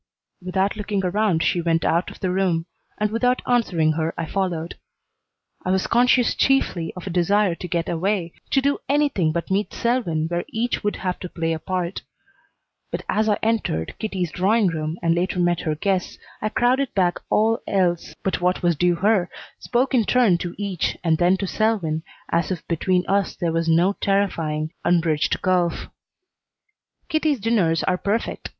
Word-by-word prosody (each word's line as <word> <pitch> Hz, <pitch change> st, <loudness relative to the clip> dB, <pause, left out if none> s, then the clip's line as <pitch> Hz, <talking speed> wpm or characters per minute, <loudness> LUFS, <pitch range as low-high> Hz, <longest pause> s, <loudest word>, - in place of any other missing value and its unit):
Without 190 Hz, +2 st, 0 dB
looking 205 Hz, -2 st, -2 dB
around 180 Hz, -3 st, +1 dB
she 175 Hz, -, +1 dB
went 165 Hz, -1 st, +1 dB
out 170 Hz, +2 st, +1 dB
of -, -, -13 dB
the 185 Hz, -2 st, 0 dB
room, 180 Hz, -3 st, +1 dB, 0.3 s
and 210 Hz, 0 st, 0 dB
without 250 Hz, +3 st, +2 dB
answering 180 Hz, -10 st, +2 dB
her 160 Hz, +1 st, -2 dB
I -, -, -2 dB
followed. 175 Hz, -2 st, -2 dB, 0.9 s
I -, -, -3 dB
was 190 Hz, 0 st, +1 dB
conscious 245 Hz, 0 st, +3 dB
chiefly 185 Hz, -11 st, +1 dB
of 180 Hz, -, -8 dB
a 190 Hz, -, -4 dB
desire 185 Hz, +2 st, +2 dB
to 180 Hz, -, -7 dB
get 170 Hz, -2 st, -1 dB
away, 175 Hz, 0 st, -1 dB, 0.2 s
to 270 Hz, -, +3 dB
do 285 Hz, +1 st, +1 dB
anything 280 Hz, -, +2 dB
but 170 Hz, +3 st, -3 dB
meet 200 Hz, +2 st, 0 dB
Selwyn 230 Hz, -11 st, 0 dB
where 175 Hz, +1 st, -2 dB
each 235 Hz, +1 st, -2 dB
would 210 Hz, -, 0 dB
have 180 Hz, -1 st, -3 dB
to 180 Hz, -, -6 dB
play 165 Hz, -1 st, -2 dB
a 160 Hz, -, -3 dB
part; 180 Hz, +1 st, -3 dB, 0.9 s
but -, -, -4 dB
as 215 Hz, +1 st, +1 dB
I 210 Hz, -, +2 dB
entered 220 Hz, -, 0 dB
Kitty's 190 Hz, -6 st, -2 dB
drawing 200 Hz, +3 st, +2 dB
room 160 Hz, 0 st, -3 dB
and 165 Hz, 0 st, +3 dB
later 180 Hz, +2 st, -1 dB
met 175 Hz, -1 st, +2 dB
her 155 Hz, -1 st, -2 dB
guests 185 Hz, +3 st, -1 dB, 0.2 s
I 215 Hz, -, 0 dB
crowded 255 Hz, +4 st, +1 dB
back 180 Hz, -3 st, +2 dB
all 225 Hz, +1 st, +2 dB
else 180 Hz, -3 st, 0 dB
but 190 Hz, -, -1 dB
what 180 Hz, +1 st, +1 dB
was 175 Hz, -1 st, +3 dB
due 175 Hz, +3 st, +2 dB
her, 190 Hz, 0 st, +2 dB, 0.3 s
spoke 255 Hz, +3 st, 0 dB
in 235 Hz, -4 st, +3 dB
turn 225 Hz, -9 st, +3 dB
to 175 Hz, 0 st, -5 dB
each, 195 Hz, -4 st, -2 dB
and 160 Hz, -2 st, +2 dB
then 180 Hz, +2 st, +4 dB
to 195 Hz, -, -2 dB
Selwyn, 190 Hz, -7 st, 0 dB, 0.3 s
as 170 Hz, -1 st, +1 dB
if 180 Hz, -3 st, -4 dB
between 180 Hz, +2 st, +1 dB
us 200 Hz, 0 st, 0 dB
there 170 Hz, -2 st, -1 dB
was 165 Hz, 0 st, 0 dB
no 175 Hz, +5 st, +4 dB
terrifying, 165 Hz, -6 st, 0 dB
unbridged 165 Hz, -3 st, +1 dB
gulf. 180 Hz, -2 st, +1 dB, 1.2 s
Kitty's 310 Hz, -4 st, +1 dB
dinners 195 Hz, -7 st, +1 dB
are 180 Hz, 0 st, 0 dB
perfect. 210 Hz, +3 st, -2 dB
185 Hz, 175 wpm, -23 LUFS, 170-210 Hz, 1.2 s, then